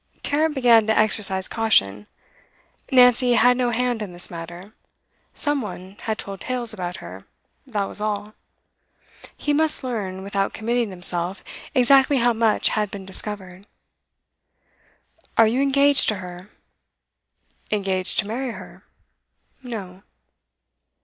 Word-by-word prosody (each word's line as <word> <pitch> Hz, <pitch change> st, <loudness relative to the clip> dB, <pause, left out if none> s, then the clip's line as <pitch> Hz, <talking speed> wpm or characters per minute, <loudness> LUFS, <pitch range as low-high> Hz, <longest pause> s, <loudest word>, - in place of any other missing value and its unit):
Tarrant 305 Hz, +1 st, +1 dB
began 235 Hz, -4 st, +4 dB
to 220 Hz, -, +2 dB
exercise 195 Hz, -3 st, +1 dB
caution. 105 Hz, -, +1 dB, 0.8 s
Nancy 250 Hz, -1 st, +5 dB
had 245 Hz, +1 st, +5 dB
no 245 Hz, -1 st, 0 dB
hand 240 Hz, -1 st, -1 dB
in 200 Hz, -4 st, -6 dB
this 175 Hz, -, -3 dB
matter; 175 Hz, +4 st, -9 dB, 0.6 s
some 290 Hz, -2 st, 0 dB
one 190 Hz, -3 st, -8 dB
had 220 Hz, -1 st, -3 dB
told 195 Hz, -1 st, -7 dB
tales 245 Hz, -3 st, -1 dB
about 180 Hz, -3 st, -5 dB
her, -, -, -11 dB, 0.4 s
that 210 Hz, -6 st, -2 dB
was 210 Hz, -, +1 dB
all. 210 Hz, 0 st, -3 dB, 1.0 s
He 295 Hz, -, -1 dB
must 310 Hz, -1 st, +1 dB
learn, 200 Hz, -7 st, -4 dB
without 195 Hz, 0 st, -2 dB
committing 235 Hz, 0 st, -1 dB
himself, 180 Hz, 0 st, 0 dB, 0.3 s
exactly 270 Hz, +2 st, +4 dB
how 240 Hz, -1 st, +3 dB
much 225 Hz, -1 st, +2 dB
had 210 Hz, -2 st, -1 dB
been 195 Hz, -1 st, -8 dB
discovered. 190 Hz, -1 st, -2 dB, 1.7 s
'Are 225 Hz, -, +7 dB
you 235 Hz, +5 st, +1 dB
engaged 280 Hz, 0 st, +4 dB
to 215 Hz, -, +1 dB
her?' 180 Hz, 0 st, -10 dB, 1.2 s
'Engaged 195 Hz, -3 st, -1 dB
to 210 Hz, -, +1 dB
marry 245 Hz, +3 st, -4 dB
her? -, -, -12 dB, 0.8 s
No. 200 Hz, -7 st, -8 dB
215 Hz, 125 wpm, -22 LUFS, 190-245 Hz, 1.7 s, Are